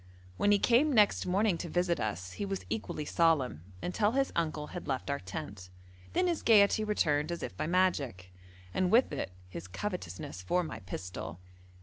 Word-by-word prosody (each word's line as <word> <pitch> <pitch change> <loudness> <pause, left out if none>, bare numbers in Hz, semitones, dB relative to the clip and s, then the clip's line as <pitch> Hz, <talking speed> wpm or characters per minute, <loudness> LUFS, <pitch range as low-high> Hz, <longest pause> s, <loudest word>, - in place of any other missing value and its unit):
When 205 - +2
he 205 - +6
came 245 +9 +4
next 210 -7 +4
morning 190 -1 +2
to 170 - -4
visit 175 +1 +1
us 95 -4 -3
he 90 - -5
was 95 -1 -3
equally 110 +7 -3
solemn, 145 - +2 0.2
until 205 +4 +1
his 270 0 +1
uncle 155 -2 -1
had 175 - -6
left 135 +1 -2
our 140 - -1
tent; 90 0 -7 0.4
then 365 - +2
his 345 -3 0
gaiety 215 -1 +5
returned 155 -7 +1
as 170 - -4
if - - -5
by 125 - -2
magic, 140 - 0 0.4
and 185 -1 +1
with 245 +3 +5
it - - -3 0.2
his 90 -1 -8
covetousness 90 - -5
for 180 - +1
my 160 - -6
pistol. 90 -2 -6
165 Hz, 180 wpm, -31 LUFS, -, 0.4 s, he